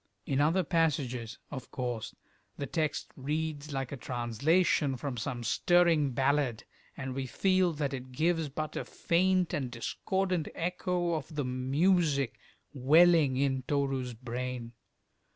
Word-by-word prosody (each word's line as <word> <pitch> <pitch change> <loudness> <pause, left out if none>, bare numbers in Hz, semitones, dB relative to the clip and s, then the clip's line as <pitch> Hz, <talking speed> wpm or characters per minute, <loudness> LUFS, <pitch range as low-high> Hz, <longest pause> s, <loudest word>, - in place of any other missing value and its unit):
In 140 0 +1
other 165 +6 +3
passages, 135 -8 0
of 130 -4 -7
course, 120 -3 -4 0.4
the 140 - -3
text 155 +2 -2
reads 150 +1 -3
like 135 -2 -3
a 140 - -4
translation 135 +5 +1
from 135 0 -4
some 120 +1 -4
stirring 165 +3 +3
ballad, 135 -3 +1 0.3
and 130 -1 -4
we 135 0 -3
feel 185 +4 +2
that 145 -2 -2
it 130 -1 -6
gives 160 +2 +1
but 155 +2 -4
a - - -2
faint 185 +1 +1
and 135 -3 -1
discordant 180 +8 -1
echo 180 0 -1
of 155 0 -4
the 145 -2 -1
music 140 +2 +1 0.3
welling 150 0 +5
in 135 -1 +1
Toru's 135 -4 -1
brain. 125 0 -5
140 Hz, 135 wpm, -30 LUFS, 130-165 Hz, 0.4 s, welling